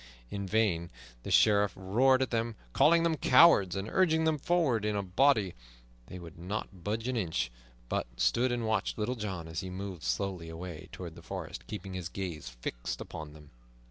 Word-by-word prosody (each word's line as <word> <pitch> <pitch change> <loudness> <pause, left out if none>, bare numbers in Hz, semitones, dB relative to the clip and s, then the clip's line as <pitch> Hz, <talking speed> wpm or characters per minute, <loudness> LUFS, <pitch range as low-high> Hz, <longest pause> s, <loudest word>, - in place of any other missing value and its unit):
In 100 -1 -4
vain 95 -5 +1 0.3
the - - -7
Sheriff 105 -3 +4
roared 130 +8 +3
at 130 - -4
them, 115 -1 -1 0.2
calling 165 +2 +5
them 165 -2 +1
cowards, 125 - +6
and 100 +1 -3
urging 160 +1 +3
them 160 -2 +1
forward 145 -9 +1
in 105 0 0
a 100 - -1
body; 100 0 +3 0.5
they 90 - -8
would 85 -2 -11
not 95 0 -5
budge 110 +4 -2
an 130 - -1
inch, 85 - -1 0.4
but - - -1
stood 120 - +2
and 120 -1 -1
watched 110 -2 0
Little 110 +3 -1
John 95 -8 -5
as 80 0 -4
he 95 -1 -5
moved 95 -2 -6
slowly 85 +8 -2
away 80 -1 -8
toward - - -7
the - - -12
forest, - - -7
keeping 100 -2 -6
his 90 -2 -4
gaze 85 -9 -5
fixed - - -5
upon 75 -1 -7
them. 75 -1 -15
100 Hz, 185 wpm, -31 LUFS, 85-120 Hz, 0.5 s, cowards